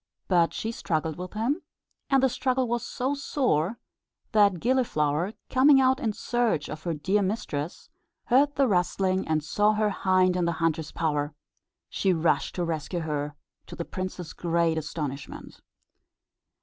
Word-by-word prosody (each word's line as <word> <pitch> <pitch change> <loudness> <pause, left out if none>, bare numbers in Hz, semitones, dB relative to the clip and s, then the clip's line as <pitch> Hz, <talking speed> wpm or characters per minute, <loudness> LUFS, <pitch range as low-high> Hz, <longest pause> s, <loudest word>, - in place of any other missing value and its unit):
But 175 -3 +3
she 225 - -3
struggled 160 -7 -2
with 180 0 -7
him; 245 +11 -1 0.5
and 270 -1 +4
the - - +6
struggle 255 0 0
was 240 0 -1
so 265 +2 -2
sore 240 - 0 0.5
that 200 -4 +4
Gilliflower, 180 - +1 0.2
coming 270 +2 +6
out 260 0 +3
in 230 -7 0
search 235 -4 -1
of 155 +1 -6
her 170 -2 -1
dear 190 +7 +1
mistress, 185 - -3 0.3
heard 280 +4 +3
the 275 -1 +3
rustling, 185 -1 +1
and 155 -1 +1
saw 210 +7 +2
her 215 -1 +1
hind 185 -1 +2
in 180 -1 +1
the 170 - +1
hunter's 160 -1 -1
power. 150 -2 -1 0.5
She 190 -2 +1
rushed 165 0 +1
to 175 - -1
rescue 165 +2 -3
her, 150 -1 -3 0.3
to - - -8
the 170 - -4
prince's 185 -2 -5
great 170 -1 +1
astonishment. 145 -3 -6
185 Hz, 150 wpm, -27 LUFS, 160-235 Hz, 0.5 s, the